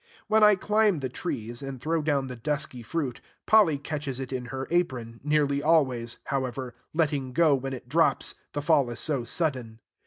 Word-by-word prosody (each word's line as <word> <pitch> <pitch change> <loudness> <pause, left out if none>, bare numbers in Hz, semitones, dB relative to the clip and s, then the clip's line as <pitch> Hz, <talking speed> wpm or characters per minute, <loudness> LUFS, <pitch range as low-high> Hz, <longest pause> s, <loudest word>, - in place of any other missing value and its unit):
When 220 0 +3
I 210 -1 +7
climb 210 -3 +2
the 130 - -2
trees, 120 0 -4
and 135 -2 -6
throw 160 +5 0
down 145 -3 +1
the 130 -1 -6
dusky 140 0 -3
fruit, 130 +1 -3 0.2
Polly 205 -9 +5
catches 145 -2 -4
it 135 0 -5
in 125 -1 -3
her 135 +2 -5
apron; 125 -10 -1
nearly 145 -1 +2
always, 130 -7 +2
however, 130 -2 -3 0.2
letting 145 -5 0
go 160 0 +4
when 135 0 -2
it 130 - -8
drops, - - +2 0.2
the 145 - -3
fall 145 -5 +3
is 120 - -4
so 140 -6 0
sudden. 125 -5 -2
140 Hz, 180 wpm, -27 LUFS, 125-155 Hz, 0.2 s, I